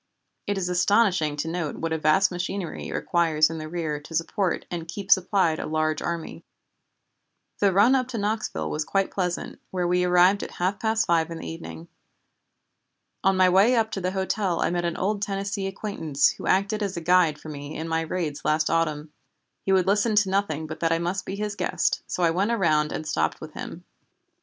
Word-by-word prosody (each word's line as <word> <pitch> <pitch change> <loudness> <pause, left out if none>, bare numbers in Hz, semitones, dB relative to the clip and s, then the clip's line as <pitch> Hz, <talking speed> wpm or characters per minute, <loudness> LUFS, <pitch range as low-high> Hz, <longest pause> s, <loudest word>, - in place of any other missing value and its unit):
It 205 0 0
is 185 -2 -1
astonishing 180 -3 +2
to 150 +2 -3
note 165 -3 -3
what 165 0 -3
a - - 0
vast 155 +6 +3
machinery 180 0 -4
it - - -6
requires 160 -2 +2
in 165 - -5
the 155 0 -6
rear 160 -3 -3
to 150 +3 -9
support 170 +3 -1
and 170 -2 -4
keep 195 +3 -6
supplied 185 -4 +3
a - - -4
large 155 0 0
army. 170 -1 -4 1.2
"The 200 -1 +4
run 205 +7 +5
up 255 -2 +2
to 250 -2 -5
Knoxville 215 +1 -2
was 150 - -1
quite 195 +4 0
pleasant, 180 -2 -3
where 180 -2 -1
we 180 +1 +2
arrived 180 +3 +4
at - - -6
half 185 +3 0
past 220 +1 +1
five 165 -1 +2
in 165 - -6
the - - -7
evening. 80 0 -8 1.4
On 195 0 +3
my 185 0 +5
way 195 +7 +5
up 220 -1 +1
to 195 - -3
the 180 - 0
hotel 190 -2 -1
I - - +1
met 175 0 -1
an 170 -1 -2
old 200 +2 -1
Tennessee 200 0 -2
acquaintance 190 -7 0
who - - -8
acted 200 +3 +1
as 195 -3 -2
a - - 0
guide 165 -3 +3
for 155 - -10
me 145 0 -7
in 160 - -4
my 165 0 0
raids 160 -3 -3
last 155 +1 +1
autumn. 155 -2 -1 0.5
He - - +3
would 190 -2 +4
listen 205 +3 +2
to 205 -2 +3
nothing 175 -6 0
but 155 0 -7
that 165 -1 +1
I 165 - +3
must 175 +3 -3
be 195 - -3
his 210 0 -3
guest, - - 0
so 180 - -2
I 165 - +4
went 190 +6 0
around 155 -9 +2
and 155 - -4
stopped 80 - 0
with - - -9
him. - - -8
180 Hz, 210 wpm, -25 LUFS, 160-195 Hz, 1.4 s, run